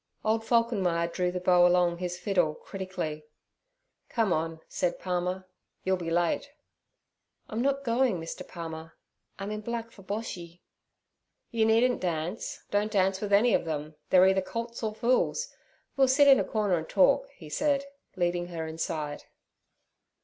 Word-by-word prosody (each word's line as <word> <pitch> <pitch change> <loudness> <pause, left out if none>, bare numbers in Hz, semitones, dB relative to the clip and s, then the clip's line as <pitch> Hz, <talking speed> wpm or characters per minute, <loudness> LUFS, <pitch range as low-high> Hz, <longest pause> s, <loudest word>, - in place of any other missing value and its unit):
Old 220 +1 +2
Falkenmeyer 210 -8 +2
drew 180 -1 0
the 180 - -3
bow 180 -1 +5
along 175 -1 +2
his 175 -1 -3
fiddle 180 -5 +1
critically. 185 -6 -5 0.9
'Come 225 -6 +1
on' 160 +1 -2
said 175 -1 -1
Palmer, 180 +1 -2 0.4
'you'll 190 0 +2
be 170 -2 -4
late.' 175 +10 +1 1.0
'I'm 220 +2 -3
not 275 +1 +1
going, 240 -5 +2
Mr. 165 0 -7
Palmer; 165 -1 -8 0.4
I'm 195 +1 -5
in 215 0 -4
black 230 +1 -4
for 200 - -15
Boshy.' 185 -4 -6 0.9
'You 225 -2 +2
needn't 240 +3 +3
dance, 175 +4 -3
don't 205 +1 +1
dance 190 -2 +2
with 205 -1 -3
any 215 +3 +5
of - - +2
them, 155 -1 -4 0.2
they're 185 0 +7
either 190 0 +4
colts 230 +4 -5
or 215 -2 -2
fools. 255 - +1 0.5
We'll 270 -1 +4
sit 280 +2 +5
in 270 -2 +8
a - - +2
corner 205 -6 0
and 160 - -8
talk' 190 - +4
he 160 - -12
said, 280 - +1 0.3
leading 175 -1 0
her 165 -2 -4
inside. 160 -2 -4
190 Hz, 155 wpm, -28 LUFS, 170-225 Hz, 1.0 s, in